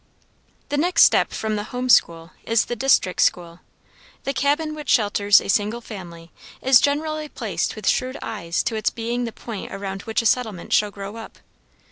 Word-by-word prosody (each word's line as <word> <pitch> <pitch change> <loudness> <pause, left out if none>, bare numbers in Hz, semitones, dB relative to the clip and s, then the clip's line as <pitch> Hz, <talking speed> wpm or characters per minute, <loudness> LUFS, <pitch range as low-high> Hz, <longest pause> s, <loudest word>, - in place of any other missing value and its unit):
The 290 - -1
next 335 +3 +4
step - - +4
from 220 -1 -3
the 205 - -4
home 250 +2 -4
school 165 -7 +3
is 230 -1 +1
the 240 - -4
district 240 -7 +2
school. 170 -1 0 0.6
The 275 - -2
cabin 295 +3 0
which 300 -2 -8
shelters 205 -2 +4
a - - -8
single 210 +4 0
family 175 -7 -10 0.3
is 260 -2 +5
generally 305 +1 -1
placed - - -3
with - - -7
shrewd 255 +1 0
eyes 170 -6 -3
to 230 - -2
its 215 - 0
being 240 +1 -3
the 230 - -5
point 220 -2 -8
around 195 0 -5
which 225 +1 -2
a - - -8
settlement 220 -6 0
shall 210 - +3
grow 200 +2 -8
up. 225 - -10
225 Hz, 180 wpm, -22 LUFS, 200-260 Hz, 0.6 s, is